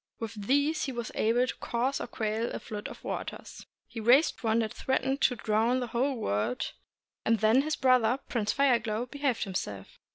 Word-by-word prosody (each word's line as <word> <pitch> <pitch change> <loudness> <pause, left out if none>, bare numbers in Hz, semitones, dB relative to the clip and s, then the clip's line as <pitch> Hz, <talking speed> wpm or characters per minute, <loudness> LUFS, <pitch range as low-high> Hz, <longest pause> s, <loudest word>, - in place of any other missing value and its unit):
With 225 -1 -5
these 285 +3 +2
he 270 - -3
was 235 -2 -5
able 235 +3 +2
to - - -4
cause 250 +4 -1
or - - -4
to - - -31
quell 220 +1 -1
a - - -4
flood 210 -2 -6
of - - -11
waters. - - -6 0.2
He 230 - -7
raised 250 +8 +4
one 225 -1 +2
that 220 -2 0
threatened 265 +1 -1
to 250 - +3
drown 225 +3 +1
the 250 - -2
whole 265 +3 +1
world, 110 - -1 0.5
and 225 0 +3
then 220 +4 +4
his 310 +2 -1
brother 255 -2 +3
Prince 215 -3 0
Fire 265 -3 +3
Glow 220 +2 -2
behaved 275 -2 -1
himself. 105 - -5
235 Hz, 195 wpm, -29 LUFS, 220-265 Hz, 0.5 s, raised